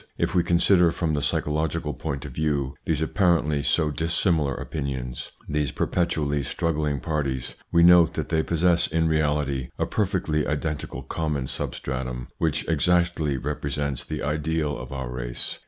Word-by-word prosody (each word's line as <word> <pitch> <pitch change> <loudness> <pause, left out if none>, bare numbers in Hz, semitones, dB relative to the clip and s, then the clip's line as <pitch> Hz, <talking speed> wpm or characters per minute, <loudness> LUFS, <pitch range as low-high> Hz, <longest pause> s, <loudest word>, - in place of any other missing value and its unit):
If - - 0
we 90 - +4
consider 85 0 +4
from 80 -2 -1
the 75 - 0
psycho 75 - 0
logical 80 0 -1
point 70 +2 -4
of 70 - -6
view 70 -1 -1
these 80 -1 +1
apparently 80 -5 +2
so 75 +1 +2
dissimilar 80 -2 +1
opinions, 65 -5 -4 0.2
these 75 -2 0
perpetually 75 -5 0
struggling 75 -2 -1
parties, 70 -3 -2 0.2
we 85 - +5
note 85 -1 +7
that 80 - -3
they 80 -1 +2
possess 85 +1 +2
in 80 +1 +1
reality 75 -4 0
a - - +1
perfectly 90 -7 0
identical 75 -3 -3
common 75 -1 -2
substratum 65 -2 -4
which 80 -1 0
exactly 85 -2 +2
represents 70 0 -2
the - - -5
ideal 75 +1 -1
of 60 +2 -8
our 65 -2 -4
race. - - -4
75 Hz, 150 wpm, -25 LUFS, 70-80 Hz, 0.2 s, note